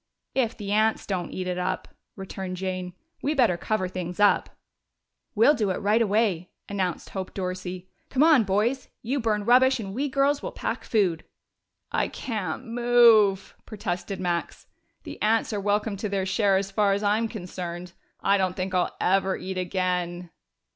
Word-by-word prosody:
"If 250 Hz, -3 st, 0 dB
the 205 Hz, -2 st, -5 dB
ants 215 Hz, +1 st, +2 dB
don't 185 Hz, -4 st, -2 dB
eat 185 Hz, -, -4 dB
it 180 Hz, 0 st, -2 dB
up," 180 Hz, -, -2 dB, 0.3 s
returned 190 Hz, -1 st, -6 dB
Jane. 185 Hz, -1 st, -4 dB, 0.3 s
"We 300 Hz, +2 st, 0 dB
better 240 Hz, -10 st, +4 dB
cover 185 Hz, +2 st, -1 dB
things 180 Hz, 0 st, -5 dB
up." 205 Hz, -1 st, +4 dB, 0.9 s
"We'll 230 Hz, +8 st, +6 dB
do 220 Hz, -8 st, 0 dB
it 185 Hz, -, -1 dB
right 210 Hz, +3 st, +2 dB
away," 205 Hz, -5 st, +1 dB, 0.2 s
announced 190 Hz, -4 st, -3 dB
Hope 190 Hz, -1 st, -5 dB
Dorsey. 185 Hz, -1 st, -4 dB, 0.2 s
"Come 270 Hz, +2 st, +3 dB
on, 310 Hz, -7 st, +6 dB
boys! 215 Hz, +7 st, 0 dB, 0.2 s
you 265 Hz, +5 st, -1 dB
burn 210 Hz, -3 st, 0 dB
rubbish, 255 Hz, +2 st, +5 dB
and 195 Hz, -3 st, -5 dB
we 280 Hz, +6 st, -1 dB
girls 275 Hz, +1 st, +2 dB
will -, -, -5 dB
pack -, -, -4 dB
food." 185 Hz, -7 st, +1 dB, 0.7 s
"I -, -, +1 dB
can't 215 Hz, -, -4 dB
move," 230 Hz, -5 st, +4 dB
protested 200 Hz, -2 st, -4 dB
Max. 175 Hz, -2 st, -3 dB, 0.4 s
"The -, -, -9 dB
ants 220 Hz, +1 st, +2 dB
are 205 Hz, -, -2 dB
welcome 205 Hz, +1 st, 0 dB
to 210 Hz, +2 st, -3 dB
their 195 Hz, -1 st, -1 dB
share 195 Hz, 0 st, +2 dB
as 195 Hz, 0 st, -2 dB
far 200 Hz, 0 st, +2 dB
as 200 Hz, +1 st, -1 dB
I'm 215 Hz, +3 st, +2 dB
concerned. 180 Hz, -4 st, -6 dB, 0.3 s
I 200 Hz, 0 st, +3 dB
don't 185 Hz, -1 st, 0 dB
think 185 Hz, 0 st, -3 dB
I'll 180 Hz, -1 st, 0 dB
ever 190 Hz, +1 st, +2 dB
eat 185 Hz, 0 st, -4 dB
again." 180 Hz, -1 st, -2 dB
200 Hz, 170 wpm, -26 LUFS, 185-225 Hz, 0.9 s, We'll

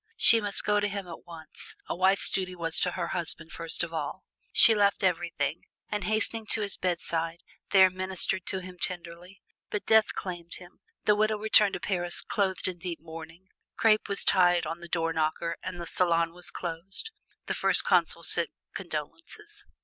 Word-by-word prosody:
She 230 Hz, -, +6 dB
must 205 Hz, -1 st, -3 dB
go 210 Hz, 0 st, +2 dB
to 205 Hz, -, 0 dB
him 200 Hz, -2 st, -5 dB
at 170 Hz, -, -10 dB
once 165 Hz, -2 st, -6 dB
a -, -, -3 dB
wife's 190 Hz, +2 st, +3 dB
duty 185 Hz, -1 st, -2 dB
was 165 Hz, -2 st, +1 dB
to 180 Hz, -, 0 dB
her 175 Hz, -2 st, -3 dB
husband 165 Hz, -2 st, -4 dB
first 165 Hz, 0 st, -2 dB
of 170 Hz, -1 st, -5 dB
all. 160 Hz, +4 st, -4 dB, 0.3 s
She 225 Hz, -, +7 dB
left 200 Hz, -2 st, +2 dB
everything, 170 Hz, -4 st, -1 dB, 0.3 s
and 210 Hz, -3 st, -3 dB
hastening 220 Hz, +1 st, +2 dB
to 220 Hz, -, +1 dB
his 200 Hz, -1 st, 0 dB
bedside, 170 Hz, -2 st, -2 dB, 0.3 s
there 190 Hz, -1 st, +7 dB
ministered 185 Hz, 0 st, 0 dB
to 190 Hz, -1 st, -2 dB
him 180 Hz, -1 st, -11 dB
tenderly. 175 Hz, +1 st, -4 dB, 0.3 s
But 210 Hz, -, -4 dB
death 220 Hz, -1 st, +4 dB
claimed 175 Hz, -2 st, -5 dB
him. 175 Hz, -1 st, -12 dB, 0.3 s
The 210 Hz, -, +5 dB
widow 215 Hz, +1 st, +1 dB
returned 210 Hz, -1 st, +4 dB
to -, -, -4 dB
Paris 175 Hz, -3 st, 0 dB
clothed 195 Hz, -3 st, -1 dB
in 180 Hz, -2 st, -4 dB
deep 170 Hz, -1 st, -5 dB
mourning. 165 Hz, +3 st, -11 dB, 0.3 s
Crape 215 Hz, -2 st, +3 dB
was 200 Hz, -, 0 dB
tied 175 Hz, -2 st, +4 dB
on 165 Hz, -, -5 dB
the 175 Hz, -, -10 dB
door 165 Hz, -1 st, -1 dB
knocker 160 Hz, +1 st, -1 dB
and 185 Hz, -1 st, -6 dB
the 170 Hz, -, -5 dB
salon 170 Hz, -1 st, +2 dB
was 180 Hz, 0 st, -1 dB
closed. 180 Hz, -, -6 dB, 0.3 s
The -, -, -2 dB
First -, -, +4 dB
Consul -, -, +2 dB
sent -, -, +3 dB, 0.2 s
condolences. 420 Hz, +5 st, -6 dB
180 Hz, 180 wpm, -28 LUFS, 170-200 Hz, 0.3 s, She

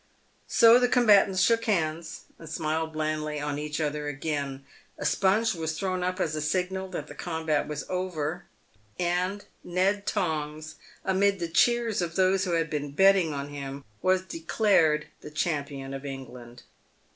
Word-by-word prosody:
So 230 Hz, 0 st, +7 dB
the 250 Hz, -, +3 dB
combatants 205 Hz, -6 st, +5 dB
shook 230 Hz, +3 st, +3 dB
hands, 160 Hz, -5 st, -1 dB, 0.2 s
and 165 Hz, -, -10 dB
smiled 160 Hz, 0 st, -2 dB
blandly 155 Hz, -1 st, -2 dB
on 145 Hz, 0 st, -3 dB
each 150 Hz, +1 st, -4 dB
other 150 Hz, -1 st, -2 dB
again. 140 Hz, -2 st, -3 dB, 0.3 s
A -, -, -5 dB
sponge 210 Hz, +4 st, +2 dB
was 160 Hz, -2 st, -3 dB
thrown 185 Hz, -2 st, -1 dB
up 185 Hz, +1 st, -2 dB
as 155 Hz, -4 st, 0 dB
a 155 Hz, -, -2 dB
signal 185 Hz, +4 st, -1 dB
that 175 Hz, -6 st, -5 dB
the 145 Hz, -, -10 dB
combat 160 Hz, -1 st, -1 dB
was 150 Hz, -1 st, -5 dB
over, 180 Hz, -3 st, -3 dB, 0.5 s
and 180 Hz, +3 st, -1 dB, 0.2 s
Ned 195 Hz, +3 st, 0 dB
Tongs, 155 Hz, -5 st, -2 dB, 0.3 s
amid 195 Hz, +1 st, +2 dB
the 170 Hz, -2 st, -3 dB
cheers 235 Hz, +2 st, +2 dB
of 170 Hz, -1 st, -3 dB
those 190 Hz, +1 st, +3 dB
who 175 Hz, -, -1 dB
had 165 Hz, -1 st, +1 dB
been 145 Hz, -1 st, -3 dB
betting 190 Hz, -1 st, +5 dB
on 140 Hz, 0 st, -4 dB
him, 140 Hz, -1 st, -7 dB, 0.2 s
was 185 Hz, 0 st, +2 dB
declared 165 Hz, -3 st, +2 dB, 0.3 s
champion 140 Hz, -5 st, -2 dB
of 135 Hz, 0 st, -6 dB
England. 125 Hz, -3 st, -9 dB
165 Hz, 155 wpm, -27 LUFS, 150-190 Hz, 0.5 s, So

